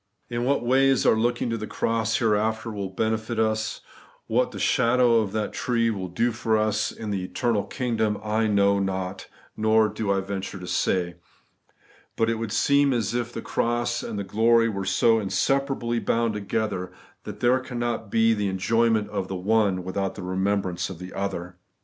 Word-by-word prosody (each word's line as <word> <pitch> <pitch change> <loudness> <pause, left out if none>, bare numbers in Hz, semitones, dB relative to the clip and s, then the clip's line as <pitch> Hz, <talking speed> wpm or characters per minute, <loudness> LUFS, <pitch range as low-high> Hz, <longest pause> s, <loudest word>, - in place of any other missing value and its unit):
In 120 0 -1
what 135 -2 +1
ways 135 +1 +3
our - - +6
looking 120 +1 0
to 115 - -2
the 110 - -5
cross 115 0 0
here 110 -3 +2
after 110 +2 -1
will 100 -2 -4
benefit 110 +3 -2
us; 110 0 0 0.4
what 125 +3 +1
the 110 - -9
shadow 120 +3 +3
of 105 -3 -1
that 110 -1 -2
tree 115 -2 +1
will 95 -4 -4
do 115 +8 0
for 110 -1 0
us 110 0 0
in 110 -2 -6
the 95 -2 -2
eternal 110 +2 -1
kingdom, 115 -5 -1
I 110 +1 +1
know 100 -1 +3
not, 95 -1 -3 0.3
nor 110 0 +3
do 105 -1 -2
I 100 -1 +1
venture 95 0 -5
to 90 - -8
say. 90 -1 0 1.0
But 115 0 +1
it 115 - -2
would 115 -2 -4
seem 140 +4 +3
as 115 -3 -1
if 120 -1 -2
the - - -6
cross 120 0 -1
and 110 - -5
the 100 - -2
glory 115 +4 +3
were 100 -3 -3
so 115 +4 +3
inseparably 120 +3 0
bound 115 -1 0
together, 100 -2 -2 0.3
that - - -8
there 125 +2 +3
cannot 120 -4 -3
be 115 +1 +3
the 105 -2 -1
enjoy 115 +5 +2
ment 110 -2 +1
of 95 -3 -2
the 95 - -4
one 100 -1 +1
without 95 +1 -3
the 100 - -7
remembrance 95 0 -1
of 95 - -7
the 90 +2 -9
other. 90 -2 -4
110 Hz, 185 wpm, -25 LUFS, 100-115 Hz, 1.0 s, our